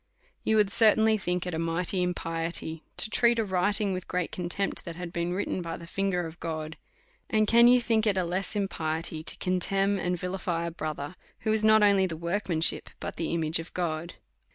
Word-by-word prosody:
You 220 Hz, -, +2 dB
would 210 Hz, -2 st, +3 dB
certainly 220 Hz, 0 st, +5 dB
tiiink 180 Hz, -1 st, -1 dB
it 180 Hz, -, -4 dB
a 160 Hz, -, -2 dB
mighty 165 Hz, +3 st, 0 dB
impiety 165 Hz, -2 st, -3 dB, 0.2 s
to 220 Hz, -, +1 dB
treat 235 Hz, +1 st, +3 dB
a 225 Hz, -, +2 dB
writing 200 Hz, +2 st, +1 dB
with 185 Hz, 0 st, -5 dB
great 180 Hz, -2 st, -2 dB
contempt^ 180 Hz, +3 st, -2 dB
that 170 Hz, -2 st, -7 dB
had 175 Hz, 0 st, -7 dB
been 170 Hz, -1 st, -1 dB
written 190 Hz, -1 st, -2 dB
by 170 Hz, -1 st, -5 dB
the 170 Hz, -, -10 dB
finger 180 Hz, 0 st, -1 dB
of 165 Hz, +1 st, -9 dB
God; 160 Hz, -1 st, -4 dB, 0.5 s
and 215 Hz, -1 st, +2 dB
can 235 Hz, +2 st, +7 dB
you 250 Hz, +1 st, +7 dB
think 225 Hz, -2 st, +1 dB
it 200 Hz, -2 st, +2 dB
a 185 Hz, -, +2 dB
less 185 Hz, +5 st, -2 dB
impiety 160 Hz, -5 st, -2 dB
to 160 Hz, -, -4 dB
contemn 195 Hz, +2 st, +1 dB
and 180 Hz, 0 st, -1 dB
vilify 180 Hz, -1 st, -2 dB
a 170 Hz, -, -3 dB
brother, 155 Hz, 0 st, -5 dB, 0.3 s
who 220 Hz, -, +1 dB
is 220 Hz, 0 st, 0 dB
not 215 Hz, 0 st, +6 dB
only 200 Hz, -2 st, +4 dB
the 165 Hz, -3 st, -5 dB
workmanship, 170 Hz, -1 st, 0 dB
but -, -, -6 dB
the 165 Hz, -, -2 dB
image 165 Hz, -1 st, 0 dB
of 165 Hz, -, -8 dB
God? 170 Hz, -1 st, -3 dB
180 Hz, 200 wpm, -28 LUFS, 165-200 Hz, 0.5 s, can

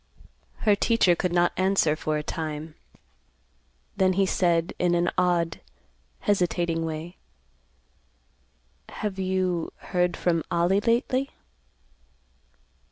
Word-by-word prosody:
Her 210 Hz, -2 st, +5 dB
teacher 200 Hz, -4 st, +3 dB
could 180 Hz, +1 st, -1 dB
not 175 Hz, 0 st, +3 dB
answer 185 Hz, -4 st, +2 dB
for 155 Hz, -1 st, -2 dB
a 150 Hz, -, -3 dB
time; 155 Hz, 0 st, -5 dB, 1.2 s
then 185 Hz, -1 st, +3 dB
he 195 Hz, +1 st, +2 dB
said, 170 Hz, -3 st, +1 dB
in 175 Hz, -1 st, +2 dB
an 175 Hz, 0 st, +1 dB
odd, 175 Hz, -2 st, +1 dB, 0.6 s
hesitating 175 Hz, -4 st, 0 dB
way, 160 Hz, +3 st, -6 dB, 1.7 s
"Have 200 Hz, -2 st, -4 dB
you 185 Hz, -3 st, -1 dB
heard 180 Hz, -1 st, -1 dB
from 165 Hz, -3 st, 0 dB
Ollie 175 Hz, +4 st, +2 dB
lately?" 255 Hz, +4 st, +1 dB
175 Hz, 100 wpm, -26 LUFS, 165-190 Hz, 1.7 s, Her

